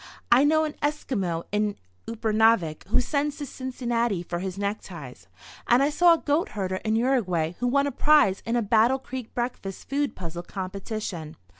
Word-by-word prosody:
"I 245 +3 +7
know 315 +2 +4
an 305 -1 -2
Esquimau 210 - -1
in 210 0 0 0.3
Upernavik 220 -7 +2
who 210 - +2
sends 290 +3 -1
to 290 - -4
Cincinnati 240 -7 -2
for 175 0 -4
his 190 0 -4
neckties, 185 - -5 0.4
and 245 +3 +5
I 290 - +2
saw 340 +2 +6
a - - -4
goat 305 +2 0
herder 185 -1 -1
in 220 +2 -1
Uruguay 210 -10 +1
who 245 - 0
won 280 +3 +3
a 285 - -1
prize 275 -8 +4
in 230 - -1
a 240 - +2
Battle 225 +5 +4
Creek 255 -3 -7
breakfast 240 -6 -4
food 285 0 -1
puzzle 175 -1 -6
competition. 190 -3 -5
225 Hz, 170 wpm, -26 LUFS, 190-270 Hz, 0.4 s, I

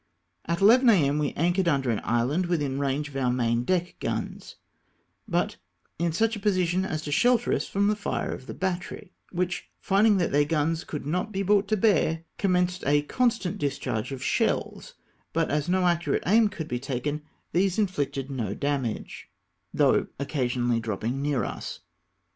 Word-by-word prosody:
At 170 +2 -2
11 240 +5 +6
A.M. 150 -8 +4
we 145 -2 0
anchored 175 +3 +1
under 135 -6 +2
an 110 - -1
island, 130 +10 +1
within 145 -6 -1
range 140 +1 -1
of 145 - -13
our 130 -2 +1
main 120 -1 +1
deck 180 +4 -1
guns, - - -4 0.7
but - - 0 0.4
in 170 0 +1
such 225 +7 +1
a - - -6
position 185 -3 +1
as 155 -4 -3
to 145 - -5
shelter 245 +9 +3
us - - -1
from 200 +1 0
the 210 - +2
fire 205 - -3
of 130 - -9
the - - -6
battery, 180 -1 -4 0.2
which, 180 0 -2
finding 205 +1 +3
that 175 - 0
their 145 +1 +4
guns 160 +2 0
could 150 -3 -5
not 180 +8 -1
be 195 -1 -1
brought 200 +1 +3
to 215 +1 +1
bear, 165 -6 +2 0.2
com 195 -2 +2
menccd 180 0 +1
a 145 +1 +3
constant 225 -1 0
discharge 135 -5 -2
of 130 -1 -5
shells; - - -1 0.4
but 165 0 +1
as 150 +2 0
no 185 0 +2
accurate 170 -1 +1
aim 220 +4 +5
could 175 -7 -6
be 125 -3 -2
taken, 140 +3 -3 0.3
these 185 +1 +1
inflicted 140 -9 -1
no 115 -7 -3
damage, 140 -6 -3 0.4
though - - +3
occasionally 125 -4 0
dropping 115 +4 -3
near 140 -5 0
us. - - -6
160 Hz, 175 wpm, -26 LUFS, 140-185 Hz, 0.7 s, 11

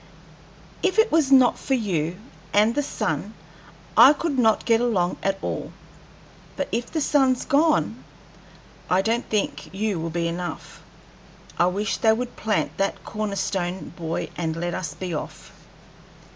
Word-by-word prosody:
If 380 +2 +1
it 445 +1 +4
was 305 -4 +3
not 260 -2 +6
for 270 - 0
you 180 -7 -1 0.4
and 215 +3 +4
the 290 - +1
sun, 285 - -3 0.6
I 280 - +9
could 290 -2 -2
not 225 -3 +3
get 230 -1 +3
along 190 -8 +1
at 195 0 0
all; - - -4 0.8
but - - -2
if 235 +1 -2
the 320 - -1
sun's 270 -4 +2
gone, 305 +2 +2 0.9
I 185 +1 +3
don't 230 +3 -1
think 155 -8 -2
you 200 -1 -2
will 165 +1 -3
be 170 +1 -1
enough. 170 -1 -6 0.8
I 175 - +5
wish 205 +4 -1
they 220 -1 +4
would 245 +2 -4
plant 215 -2 -1
that 195 0 -1
corner 215 -2 -3
stone 185 -2 -3
buoy 165 -2 -4
and 160 -2 -2
let 175 +1 -3
us 185 -4 -4
be 185 -2 -5
off." 150 - -6
210 Hz, 155 wpm, -24 LUFS, 175-250 Hz, 0.9 s, I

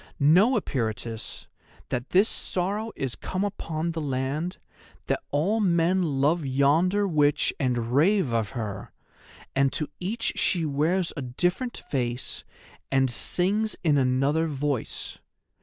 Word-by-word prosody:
Know, 185 - +5
Eperitus, 115 - -4 0.4
that 125 +1 -3
this 195 +4 +4
sorrow 205 +5 -2
is 135 -3 -3
come 185 +1 -3
upon 170 -5 -2
the 165 -1 -4
land, 140 +5 -2 0.5
that - - 0
all 185 +10 +1
men 180 -1 +3
love 150 +1 +1
yonder 155 +9 +2
witch 150 -4 +2
and 120 -3 0
rave 160 - +3
of 110 -3 0
her, 105 -4 -5 0.6
and 135 0 +3
to 150 - -1
each 220 +6 -2
she 175 -4 +2
wears 160 +5 +1
a 145 - -4
different 180 - -1
face 125 -2 -2 0.5
and 135 -2 +3
sings 200 - +1
in 150 -4 +4
another 135 +5 +2
voice. 140 -4 -3
150 Hz, 125 wpm, -26 LUFS, 135-185 Hz, 0.6 s, Know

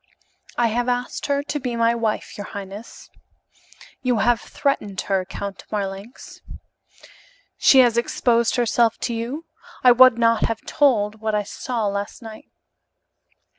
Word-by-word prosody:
"I 235 -1 +3
have 240 +2 -1
asked 245 0 -2
her 280 0 0
to 295 0 -3
be 250 -3 -3
my 230 0 +2
wife, 225 -2 -2
your 205 - -7
highness." 200 +2 -9 0.9
"You 250 -2 +1
have 240 +2 +2
threatened 210 -9 -2
her, 190 -2 -1
Count 200 +1 -7
Marlanx." 200 +3 -6 1.2
"She 265 - +7
has 235 -2 +3
exposed 235 0 +1
herself 235 -2 +2
to 240 - -2
you? 245 +8 -4 0.4
I 250 - +8
would 255 -1 +7
not 230 -2 +3
have 225 -1 -5
told 220 -7 +1
what 220 -1 -1
I 210 - 0
saw 230 +2 -4
last 200 +3 -4
night." 220 -1 -11
230 Hz, 140 wpm, -22 LUFS, 210-245 Hz, 1.2 s, I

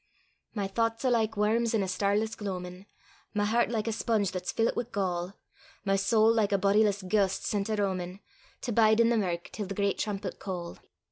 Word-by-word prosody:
My 200 -2 -1
thouchts 230 +4 -1
are 255 - +3
like 220 -2 +1
worms 225 +2 +2
in 210 - +2
a - - -2
starless 205 +4 0
gloamin'; 185 -1 -6 0.5
My 205 0 +2
hert 235 +3 +2
like 225 -1 -2
a - - +1
sponge 220 -3 0
that's 180 -1 -3
fillit 225 0 +1
wi' 240 - -1
gall; 185 -2 -2 0.5
My 195 0 +2
sowl 220 +3 +4
like 215 -3 +1
a 200 - +3
bodiless 200 +1 +2
ghaist 195 0 +1
sent 205 0 -1
a 215 - +1
roamin', 190 -2 -2 0.4
To 245 - -3
bide 220 0 +4
i' 230 - +6
the 235 - +3
mirk 175 -5 -2
till 205 -3 -5
the 195 - -5
great 200 -1 0
trumpet 200 -3 -3
call. 175 -3 -6
205 Hz, 200 wpm, -29 LUFS, 190-220 Hz, 0.5 s, i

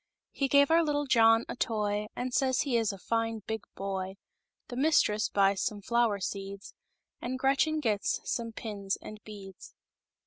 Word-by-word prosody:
He 275 - 0
gives 280 +2 +5
our 330 +1 +6
little 290 -2 0
Jo>6/i 225 -3 +5
a - - -5
5%, 210 -3 -1
And 250 0 -3
says 260 -1 +2
he 275 -5 -1
is 225 -2 +2
a 195 - -8
fine, 225 +1 -2
The 220 - -2 1.1
mistresshwys 210 -8 +2
some 210 -4 -2
Flo'wer 235 -2 +2
Seeds, 195 +1 -6 0.5
And 255 +2 -3
Gretchen 275 +4 +2
gets 215 -8 0
some 230 -1 -3
Pins 205 -3 -4
andiBeac/s 210 -3 -11
225 Hz, 140 wpm, -30 LUFS, 205-260 Hz, 1.1 s, our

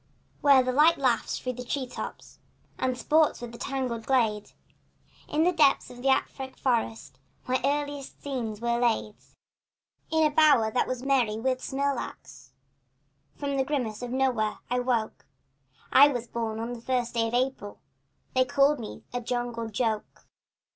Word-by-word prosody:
Where 275 -3 +6
the 255 - 0
light 305 +6 +5
laughs 255 -4 0
in - - -11
through 250 -1 -4
the 245 - -18
tree 275 -2 -1
tops 250 - -8 0.4
And 255 -1 0
sports 310 +4 +2
with 240 -1 -7
the 235 - -11
tangled 250 -4 -3
glade, 220 -6 +1 0.8
In 310 +2 +1
the 355 - +4
depths 300 -7 +3
of 245 - -12
an 260 - -2
Afric 265 0 0
forest 230 -3 -1 0.3
My 255 0 0
earliest 285 0 -2
scenes 235 -6 -4
were 235 0 0
laid. 230 -3 +1 1.0
In 320 -1 +3
a 305 - +2
bower 290 -8 +5
that 245 - +1
was 255 -1 -4
merry 250 -6 +2
with 255 +2 -1
smilax 280 +1 -4 0.8
From 280 -1 -3
the 265 - +2
grimace 250 -7 -2
of 245 - -5
no 265 +1 +2
where, 215 -3 -2
I 250 - +2
woke 240 -3 -2 0.6
I 285 - +8
was 245 -4 -3
born 225 -2 -3
on 230 +2 -4
the 235 - -8
first 245 -1 -1
day 230 -1 +1
of 230 - -2
April 250 -5 -2 0.6
And 255 - +4
they 255 - +1
called 280 0 +4
me 220 - -8
a 245 - -2
jungle 240 -1 -3
joke. 220 -1 -3
250 Hz, 170 wpm, -27 LUFS, 230-275 Hz, 1.0 s, I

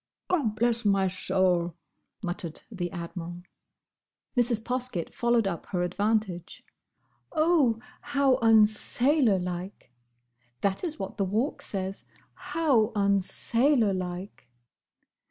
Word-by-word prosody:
"Gobblessmysoul!" 195 - +1 0.5
muttered 175 -3 -5
the 175 -5 -4
Admiral. 175 0 -7 0.9
Mrs. 240 -2 +2
Poskett 250 -8 -3
followed 235 -2 +2
up 170 -3 -4
her 180 -2 -1
advantage. 195 -1 -1 0.7
"'Oh, 310 -8 +3 0.2
how 280 -3 +2
unsailor 225 +2 +4
like!'"—that 125 - -6
is 320 -3 -3
what 195 -2 -6
the 200 - +1
Walk 220 +10 -1
says: 190 -1 -2 0.3
"'How 265 -9 +1
unsailor 205 +4 +3
like! 180 -6 -6
200 Hz, 85 wpm, -27 LUFS, 180-240 Hz, 0.9 s, unsailor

